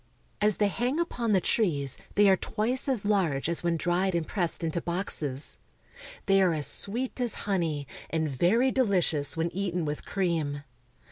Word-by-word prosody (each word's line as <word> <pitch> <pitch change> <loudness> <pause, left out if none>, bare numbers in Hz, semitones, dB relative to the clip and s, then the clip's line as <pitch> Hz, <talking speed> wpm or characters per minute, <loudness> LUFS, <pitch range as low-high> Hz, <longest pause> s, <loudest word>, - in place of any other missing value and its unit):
As 210 -1 +3
they 205 - +3
hang 250 - -1
upon 245 -9 -2
the 200 -3 +4
trees 150 - 0 0.2
they 205 0 +5
are 190 - +6
twice 240 +8 +1
as 240 -7 0
large 180 -10 +1
as 170 0 0
when 170 -1 0
dried 180 +2 0
and 170 -2 0
pressed 175 -3 0
into 165 +1 -1
boxes. 160 -6 -2 0.7
They 195 -1 +4
are 180 -3 +3
as 150 -2 0
sweet 245 +5 -2
as 240 -3 -1
honey, 165 -8 -1 0.2
and 160 -1 0
very 190 - +2
deli 205 -9 +2
cious 145 -2 -1
when 165 +1 0
eaten 180 -3 -2
with 150 0 -4
cream. 160 -7 -1
180 Hz, 175 wpm, -28 LUFS, 160-210 Hz, 0.7 s, are